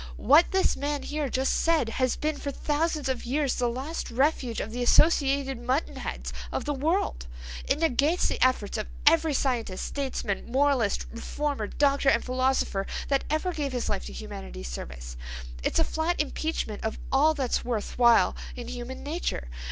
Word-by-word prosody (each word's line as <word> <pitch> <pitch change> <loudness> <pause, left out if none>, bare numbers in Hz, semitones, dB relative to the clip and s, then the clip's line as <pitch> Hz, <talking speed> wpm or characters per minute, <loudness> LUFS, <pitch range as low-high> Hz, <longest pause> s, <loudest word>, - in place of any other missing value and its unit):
What 295 +8 +6
this 380 0 +2
man 285 0 -2
here 295 -2 -2
just 260 +2 +1
said 330 -7 +2
has 255 +2 +1
been 310 0 -1
for 285 - -3
thousands 300 +1 -1
of 260 -2 -1
years 275 +2 0
the 245 -1 0
last 270 +7 -4
refuge 255 -2 +1
of - - -4
the 245 +2 -4
associated 270 -1 +3
mutton 255 +6 -1
heads - - -5 0.2
of - - -2
the 295 - 0
world. 290 - 0 0.4
It 270 - +2
negates 315 +2 +2
the - - 0
efforts 235 -4 +1
of 215 - -3 0.2
every 315 -1 +5
scientist, 235 -9 -1
statesman, 260 -7 -3
moralist, 265 -5 +2
reformer, 275 0 -3
doctor, 280 +1 +2
and 235 - +2
philosopher 255 -6 0 0.2
that 275 -1 +1
ever 310 +4 0
gave 285 -4 -2
his 245 - -2
life - - -2
to 65 - -8
humanity's 60 -1 -7
service. - - -7 0.4
It's - - 0
a 325 - +5
flat 320 +2 -1
impeachment 300 -7 -2
of 220 - -2
all 305 +4 +4
that's 265 -5 0
worth 235 -1 -3
while 235 -1 +5 0.2
in 245 -1 -7
human 250 +1 -6
nature. 290 - -3
270 Hz, 170 wpm, -27 LUFS, 235-300 Hz, 0.4 s, What